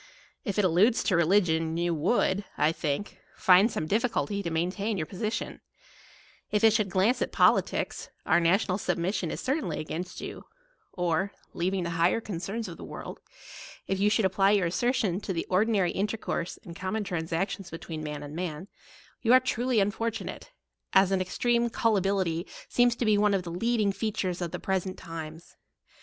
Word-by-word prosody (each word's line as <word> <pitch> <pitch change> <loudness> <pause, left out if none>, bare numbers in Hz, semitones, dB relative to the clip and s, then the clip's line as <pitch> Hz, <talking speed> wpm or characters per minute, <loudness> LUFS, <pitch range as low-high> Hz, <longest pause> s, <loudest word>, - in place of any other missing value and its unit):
If 200 -5 -3
it 205 - +3
alludes 190 +7 +4
to 190 - +2
religion, 165 -2 +2
you 170 0 +1
would, 190 +4 +1
I 155 - +3
think, 160 +4 -3 0.2
find 190 +4 +5
some 155 - -3
difficulty 210 +1 0
to 170 - -3
maintain 185 +6 -1
your 155 - -1
position: 215 +6 -4 0.9
if 210 0 0
it 220 -1 +7
should 215 -3 +1
glance 195 +7 +2
at - - -1
politicks, - - +2 0.2
our - - +4
national 185 +3 +2
submission 180 0 -1
is - - -4
certainly 240 - -1
against 165 +3 -5
you: - - -7 0.5
or, 180 +2 -1 0.2
leaving 185 +1 -1
the 170 - -3
higher 175 +6 +4
concerns 205 +2 -4
of 170 - -8
the - - -9
world, - - -8 0.7
if 195 - -2
you 205 +1 +4
should 215 -1 +2
apply 195 +1 +3
your 200 -3 +3
assertion 205 0 0
to 195 - -3
the 165 - -2
or 185 +4 +4
dinary 200 -6 +1
intercourse 205 -3 -2
and 170 - -10
common 190 +5 -2
transactions 175 +2 -3
between 165 -1 -6
man 150 -1 -5
and 145 +1 -8
man, 175 +1 -4 0.5
you 230 - +2
are 255 - +9
truly 255 -1 -1
unfor 210 +3 +1
tunate, 230 - -7 0.4
as 190 0 +5
an 190 -1 +2
extreme 235 +5 +1
Gullibility 195 -6 +1 0.2
seems 245 -1 +3
to 235 - -2
be 210 -1 +4
one 205 -1 +3
of 190 - -1
the 170 - -6
leading 215 +2 +1
features 195 -4 -2
of 175 - -2
the - - -5
present 190 -1 -2
times. 165 -1 -9
190 Hz, 175 wpm, -28 LUFS, 170-215 Hz, 0.9 s, are